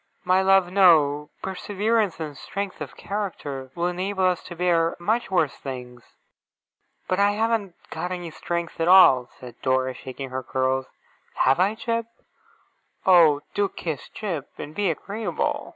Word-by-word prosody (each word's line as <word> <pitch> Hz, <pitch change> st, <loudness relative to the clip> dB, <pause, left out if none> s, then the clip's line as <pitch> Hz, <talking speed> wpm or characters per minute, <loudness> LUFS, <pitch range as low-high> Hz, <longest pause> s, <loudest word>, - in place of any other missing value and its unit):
'My 185 Hz, +1 st, +4 dB
love, 190 Hz, -2 st, +4 dB
no. 150 Hz, -6 st, +4 dB
Perseverance 205 Hz, +1 st, -1 dB
and 155 Hz, -3 st, -5 dB
strength 195 Hz, +7 st, -5 dB
of -, -, -7 dB
character 150 Hz, -10 st, -5 dB
will 170 Hz, -, -1 dB
enable 185 Hz, +2 st, -1 dB
us 180 Hz, -1 st, +1 dB
to 175 Hz, -, -8 dB
bear 170 Hz, -1 st, +2 dB
much 220 Hz, +5 st, 0 dB
worse 175 Hz, -6 st, +1 dB
things.' 125 Hz, -3 st, -9 dB, 0.9 s
'But 185 Hz, -, 0 dB
I 200 Hz, 0 st, +4 dB
haven't 220 Hz, -4 st, -1 dB, 0.2 s
got 180 Hz, -, -4 dB
any 175 Hz, -2 st, -5 dB
strength 170 Hz, +1 st, -4 dB
at 165 Hz, -, +1 dB
all,' 135 Hz, -9 st, +7 dB
said 125 Hz, -2 st, -12 dB
Dora, 130 Hz, 0 st, +1 dB
shaking 130 Hz, +1 st, -8 dB
her 130 Hz, 0 st, -3 dB
curls. 130 Hz, +1 st, -1 dB, 0.5 s
'Have 130 Hz, +4 st, +3 dB
I, 195 Hz, +4 st, +2 dB
Jip? 230 Hz, 0 st, -2 dB, 1.0 s
Oh, 165 Hz, -6 st, +6 dB
do 205 Hz, -1 st, +1 dB
kiss 160 Hz, -5 st, -5 dB
Jip, 170 Hz, -10 st, -5 dB
and 150 Hz, -, -7 dB
be 200 Hz, +2 st, 0 dB
agreeable! 200 Hz, +7 st, -3 dB
175 Hz, 150 wpm, -24 LUFS, 145-195 Hz, 1.0 s, all